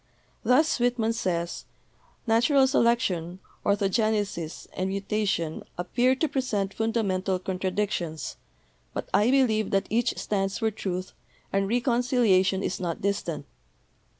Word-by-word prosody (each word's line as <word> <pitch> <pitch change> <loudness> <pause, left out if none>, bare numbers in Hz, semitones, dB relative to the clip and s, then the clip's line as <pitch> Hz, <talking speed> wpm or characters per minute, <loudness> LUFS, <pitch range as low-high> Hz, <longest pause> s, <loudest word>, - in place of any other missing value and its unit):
Thus 255 +6 +3
Whitman 240 -2 +1
says: 170 -6 -2 0.6
"Natural 250 +5 +4
selection, 235 -9 +1 0.3
orthogenesis 200 -4 0
and 185 +1 -2
mutation 195 -5 -1 0.2
ap 175 0 -6
pear 255 +2 +4
to 315 +4 0
present 220 -9 -1
fundamental 200 -4 0
contradictions, 185 -3 -2 0.6
but - - -3
I 210 +3 +4
believe 235 -6 +3
that 195 0 +1
each 235 +2 +1
stands 195 -2 -1
for 220 -1 0
truth, 185 -3 -4 0.4
and 195 0 +2
reconciliation 235 -5 +2
is 185 - -2
not 170 -3 -3
distant. 200 -5 -1
205 Hz, 115 wpm, -27 LUFS, 185-235 Hz, 0.6 s, Natural